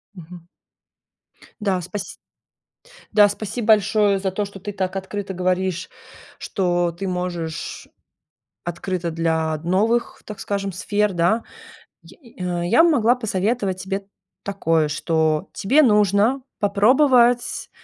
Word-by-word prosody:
Мгм. 175 -1 -11 1.2
Да, 195 -3 0
спаси 195 +3 -6 1.0
да, 210 -1 +6
спасибо 215 +3 -5
большое 210 -1 +4
за 190 -1 -1
то, 205 +2 -2
что 200 -1 -10
ты 205 - -5
так 190 -1 -3
открыто 195 0 -5
говоришь, 185 0 -1 0.5
что 175 -2 0
ты 190 +3 -5
можешь 175 -3 -4 0.8
открыта 175 0 -3
для 160 -1 0
новых, 205 +9 0
так 210 -2 -8
скажем, 200 0 -3
сфер, 205 +2 0
да. 175 +7 +1 0.6
Й 245 -7 -18
а, 175 -1 -2
я 230 - +5
могла 250 -9 +4
посоветовать 205 -4 -1
тебе 195 +1 -4 0.4
такое, 165 -6 0
что 155 0 0
тебе 270 +10 +3
нужно 210 +2 +3 0.2
попробовать 240 +4 +3
195 Hz, 115 wpm, -22 LUFS, 175-215 Hz, 1.2 s, да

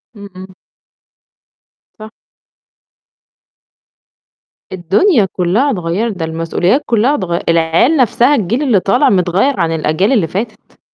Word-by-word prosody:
إمم، 200 -1 -11
إمم. 185 0 -12 1.5
صح. 215 0 -10 2.6
الدنيا 195 - +1
كلّها 200 +11 0
اتغيّرت 190 +2 -3
ده 165 - -3
المسؤوليات 165 - -1
كلّها 235 +5 +1
اتغ 175 -7 -3
العيال 165 - +2
نَفْسها 255 +2 +2
الجيل 235 +5 -2
اللي 240 -9 +2
طالع 195 +2 +1
متغيّر 190 +7 0
عن 165 -2 0
الأجيال 160 - -1
اللي 210 -11 +1
فاتت. 215 +6 -7
195 Hz, 110 wpm, -14 LUFS, 170-235 Hz, 2.6 s, العيال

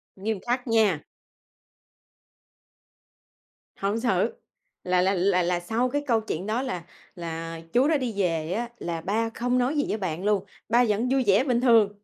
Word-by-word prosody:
Nghiêm 205 +1 -2
khắc 245 +2 -2
nha. 215 -9 +2 2.7
Hổng 200 +3 0
xử, 245 - +1 0.5
là 180 0 +2
là 190 +2 +2
là 180 -1 +2
là 175 0 0
sau 225 +8 0
cái 290 +2 -1
câu 225 -2 +3
chuyện 190 -4 -4
đó 225 +4 0
là 210 -11 -4 0.3
là, 165 -1 -5
ờ, 165 - -8
chú 255 +4 +4
đã 310 -2 +3
đi 250 -4 -3
về 165 -3 0
á 235 +3 -2
là 165 -1 -3
ba 220 +5 0
không 245 +2 -1
nói 255 +5 +1
gì 290 - +2
với 215 - -1
bạn 180 -2 -3
luôn, 205 -2 +2 0.2
ba 240 +1 +5
vẫn 220 +4 +1
vui 265 -1 +2
vẻ 200 +6 +5
bình 245 -3 +1
thường. 230 -5 +5
215 Hz, 180 wpm, -26 LUFS, 180-245 Hz, 2.7 s, ba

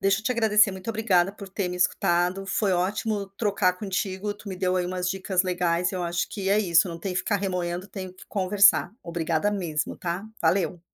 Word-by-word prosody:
deixa 195 +1 +2
eu - - -20
te 250 - +2
agradecer. 215 -3 +4
Muito 190 +2 -8
obrigada 195 -4 +2
por 200 -1 -10
ter 190 -1 -2
me 180 - -4
escutado. 180 +1 +1
Foi 195 0 +1
ótimo 200 +3 -1
trocar 200 -4 +1
contigo. 195 +1 -3
Tu 205 0 -11
me 190 - -5
deu 185 0 0
aí 180 -1 0
umas 180 0 -2
dicas 190 0 0
legais. 180 -1 0
Eu 180 -1 -2
acho 170 0 -1
que 195 -2 -4
é 205 - +4
isso. 175 -3 +3
Não 170 -1 -6
tem 185 +2 -4
que 180 - 0
ficar 205 - 0
remoendo. 180 -1 -2
Tenho 185 -3 -7
que 185 - -15
conversar. 200 0 +3
Obrigada 170 +2 -1
mesmo, 165 -7 -2
tá? 175 +3 -3 0.2
Valeu. 175 0 +1
185 Hz, 210 wpm, -26 LUFS, 180-200 Hz, 0.2 s, agradecer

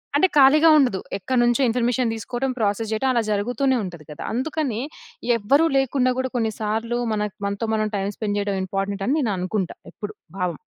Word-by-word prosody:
అంటే 375 +6 +5
ఖాళీగా 300 +4 +7
ఉండదు. 245 -10 +3 0.2
ఎక్కడ్నుంచో 240 +4 +1
ఇన్ఫర్మేషన్ 245 0 +1
తీసుకోవటం, 255 +4 -3
ప్రాసెస్ 215 +1 0
చేయడం 260 +5 0
అలా 235 -2 +2
జరుగుతూనే 245 +6 +1
ఉంటది 170 -5 -8
గదా. 150 - -7
అందుకని 260 -3 -1 0.6
ఎవ్వరు 275 +10 +3
లేకుండా 255 -1 +2
గూడా 260 -1 -2
కొన్ని 225 -2 0
సార్లు 225 +3 -1
మనకు 210 -1 -2
మనతో 200 +3 -2
మనం 215 0 0
టైమ్ 200 +1 -2
స్పెండ్ 205 -2 -2
చేయడం 200 -1 -1
ఇంపార్టెంట్ 195 +1 -3
అని 280 - +2
నేను 230 -7 0
అనుకుంటా. 185 +1 -2 0.2
ఎప్పుడు. 210 0 -7 0.3
భావం. 175 -4 -1
225 Hz, 170 wpm, -23 LUFS, 205-260 Hz, 0.6 s, ఖాళీగా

